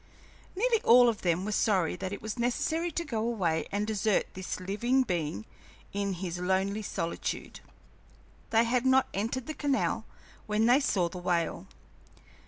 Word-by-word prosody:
Nearly 455 +3 +2
all 245 +1 +7
of 225 - -3
them 175 +1 0
were 215 - -2
sorry 190 -7 +2
that 190 +1 -4
it 200 - -6
was 220 +3 -5
necessary 320 +8 0
to 340 +2 -3
go 235 -7 -2
away 195 -9 0
and 205 +1 0
desert 215 -1 +1
this 185 0 -5
living 235 +8 +1
being 155 - -3 0.5
in 200 -1 -1
his 175 -1 -4
lonely 190 +3 0
solitude. 170 -4 -4 0.9
They 225 0 +4
had 240 +1 +1
not 260 0 +4
entered 230 +5 -2
the 310 - -4
canal 285 -3 0 0.4
when 215 +1 +2
they 245 +3 +6
saw 190 -11 +1
the 180 +2 -7
whale. 175 -2 -1
210 Hz, 160 wpm, -29 LUFS, 185-245 Hz, 0.9 s, all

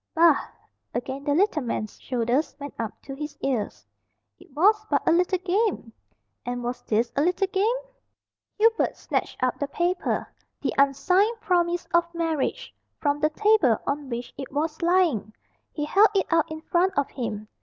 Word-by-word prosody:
"Bah!" 330 -2 +5 0.5
Again 265 +3 -4
the 285 - +2
little 365 -3 +2
man's 230 -4 -4
shoulders 250 +4 0
went 285 -1 -7
up 225 -2 -4
to 275 - -7
his 295 +1 -6
ears. 245 - -2 0.5
"It - - -17
was 420 +7 +4
but - - 0
a - - +6
little 360 +2 +3
game." 370 - -1 0.5
"And 245 0 -4
was 245 +1 -3
this 230 +2 0
a 280 - +2
little 360 +5 +2
game?" 395 +5 +1 0.8
Hubert 450 +1 +2
snatched - - -3
up 255 - 0
the 285 - -1
paper, 350 +5 -1 0.3
the - - -2
unsigned 365 - +3
promise 350 -4 +1
of 340 0 +3
marriage, 325 -4 -2 0.3
from 290 -1 +1
the 305 +1 +2
table 350 - +3
on 280 -1 -2
which 240 0 -5
it 270 - -6
was 305 +3 -2
lying; 335 - +2 0.4
he 295 - -3
held 400 +7 +5
it 385 - +3
out 330 -2 +3
in 315 0 -6
front 355 +2 +1
of 285 - +1
him. 215 -4 -4
305 Hz, 165 wpm, -25 LUFS, 265-360 Hz, 0.8 s, a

